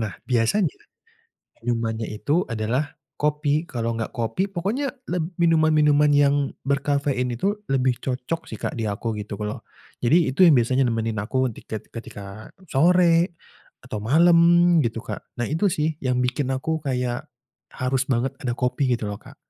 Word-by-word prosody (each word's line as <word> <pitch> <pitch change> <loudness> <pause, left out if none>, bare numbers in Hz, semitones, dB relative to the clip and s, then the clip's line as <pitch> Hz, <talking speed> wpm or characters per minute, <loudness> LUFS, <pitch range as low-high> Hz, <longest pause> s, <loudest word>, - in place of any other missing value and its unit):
Nah 110 -4 -3
biasanya 125 - +1 0.9
minumannya 115 -1 -2
itu 145 +11 0
adalah 125 +8 -2 0.2
kopi. 150 +1 0
Kalau 115 -1 -2
enggak 115 -1 -3
kopi, 150 - -2
pokoknya 205 +10 -2 0.2
leb 175 -1 -2
minuman-minuman 155 -3 +4
yang 145 -1 +3 0.2
berkafein 140 -2 0
itu 190 - 0 0.2
lebih 130 -2 +2
cocok 135 +6 -3
sih - - -6
Kak - - -3
di 110 -3 -2
aku 110 +2 -3
gitu. 105 -1 -6
Kalau 105 0 -4 0.4
jadi 130 +8 +5 0.2
itu 185 - +3
yang 165 -7 +7
biasanya 130 +3 +2
nemenin 115 -2 -1
aku 130 +5 0
di - - -12
ket 110 - -7
ketika 100 -2 -9 0.2
sore, 170 +3 +3 0.4
atau 125 -5 -6
malam 165 +10 +5 0.5
gitu 115 -2 -2
Kak. - - -6 0.2
Nah 120 - 0
itu 175 +6 +1
sih 155 -1 0
yang 125 -2 0
bikin 125 +2 0
aku 155 +4 -2
kayak, 125 -3 -2 0.4
harus 130 0 -1
banget 130 +2 0
ada 130 - -1
kopi 125 +1 0
gitu 115 -3 0
loh 105 0 -5
Kak. - - -14
130 Hz, 155 wpm, -23 LUFS, 115-155 Hz, 0.9 s, yang